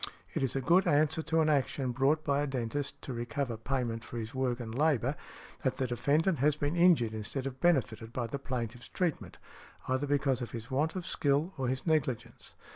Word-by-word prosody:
It - - -1
is 135 -2 0
a 135 - 0
good 175 +7 +4
answer 155 0 +3
to 160 0 +1
an 155 - +3
action 135 -2 +1
brought 140 +5 +2
by 140 -1 +1
a 145 - 0
dentist 135 +2 -3
to 130 - -4
recover 120 +1 -2
payment 115 -1 -2
for 120 - -7
his 115 0 -5
work 130 -2 0
and 110 -2 -5
labor, 140 -1 +2 0.5
that 130 - 0
the 130 - 0
defendant 145 +7 +1
has 145 +2 +3
been 145 +2 -1
injured 170 -11 +4
instead 110 +5 -3
of 135 -1 -5
benefited 120 -10 +1
by 120 0 -2
the 125 +5 -4
plaintiff's 120 -3 -4
treatment, 175 -4 -2 0.5
either 130 +3 0
because 135 -2 +1
of 120 - -5
his 115 +1 -7
want 150 +6 +1
of 185 -2 -4
skill 145 +6 +1
or 135 -3 -2
his 130 +1 -2
negligence. 150 -8 -1
135 Hz, 200 wpm, -31 LUFS, 120-150 Hz, 0.5 s, good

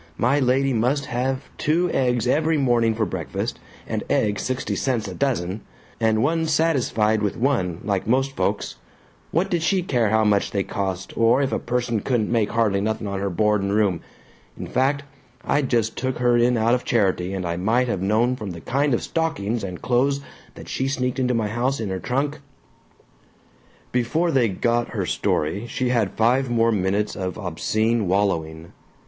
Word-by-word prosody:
my 135 +5 +2
lady 135 +1 +2
must 130 +5 +1
have 130 +2 -2
two 170 +4 +2
eggs 125 -3 +1
every 155 +5 +2
morning 120 -5 +2
for 110 0 0
breakfast, 85 -7 -4 0.3
and - - -3
eggs 105 -1 +1
sixty 130 0 -2
cents 120 -6 -1
a 95 - -6
dozen, 105 -6 -1 0.4
and 110 0 +2
wa'n't 160 +2 +1
satisfied 125 -9 +2
with 105 -2 -1
one, 115 -10 0
like 100 -1 -1
most 135 +3 +1
folks - - -1 0.5
what 170 +5 +1
did 175 -3 0
she 185 +2 +1
care 120 - +1
how 110 +1 +3
much 105 -1 +2
they 100 -2 -1
cost 95 -1 -4
or 115 +4 +4
if 135 - -1
a - - 0
person 120 -2 -1
couldn't 115 0 0
make 115 -3 +2
hardly 105 -4 +1
nothing 110 +1 -2
on 100 -1 -3
her 100 0 -1
board 105 +2 +1
and 100 +1 -1
room, 100 -6 +1 0.6
in - - -5
fact 140 +2 0 0.4
I 145 - +1
just 115 -5 0
took 130 -1 -2
her 120 0 +3
in 120 +1 +3
out 115 +2 +2
of 125 - +1
charity 95 -4 +1
and 95 -2 -3
I 85 0 -1
might 115 +8 +1
have 100 -6 -2
known 110 +6 +2
from 105 -7 -6
the 85 - -9
kind 140 0 +1
of - - -3
stockings 120 -10 -1
and 90 -2 -6
clothes 135 +3 +1 0.3
that - - -11
she 130 - -2
sneaked 130 -1 -1
into 125 -1 +1
my 110 -2 0
house 125 +5 -1
in 110 -3 -3
her 95 0 -3
trunk 140 +7 -1 0.8
" - - -33
Before 155 +8 +1
they 130 -6 +3
got 120 +5 -1
her 100 -4 -1
story 90 +6 -1
she 125 +2 -1
had 115 -6 0
five 125 +4 +2
more 115 -1 +3
minutes 100 +1 0
of 90 -2 -4
obscene 110 +4 0
wallowing. 85 -4 -1
115 Hz, 185 wpm, -23 LUFS, 100-130 Hz, 0.8 s, or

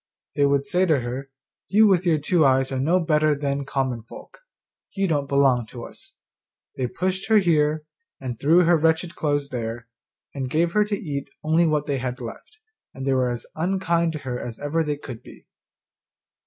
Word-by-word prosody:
They 140 -1 +3
would 140 0 +1
say 180 +6 +1
to 155 -6 +3
her, 125 +3 -5 0.4
'You 215 +2 +5
with 185 -3 +3
your 160 -2 +4
two 160 +3 +2
eyes 135 -1 +3
are 130 - -2
no 165 +7 +2
better 155 -3 +2
than 140 -1 -2
common 130 -4 -2
folk; 115 - -13 0.6
you 195 -1 +1
don't 145 -4 0
belong 135 -4 +3
to 120 0 -9
us.' - - -12 0.6
They 130 - -1
pushed 185 +7 -2
her 220 -1 +5
here, 155 -5 +2 0.4
and 125 -4 -5
threw 165 +5 +5
her 170 0 +5
wretched 160 +2 +1
clothes 145 -3 -1
there, 115 -2 -5 0.5
and 135 -2 -4
gave 165 +4 +1
her 210 +2 +3
to 205 -1 -2
eat 140 -6 -5
only 160 +2 +3
what 150 -2 +1
they 140 -3 -2
left, 125 - -6 0.4
and 135 - -6
they 135 - +2
were 130 -1 +2
as 120 -1 -5
unkind 170 -1 0
to - - -3
her 125 -1 -3
as 115 -2 -6
ever 155 +3 -1
they 150 -1 -2
could 125 -5 -9
be. - - -15
145 Hz, 190 wpm, -24 LUFS, 130-170 Hz, 0.6 s, You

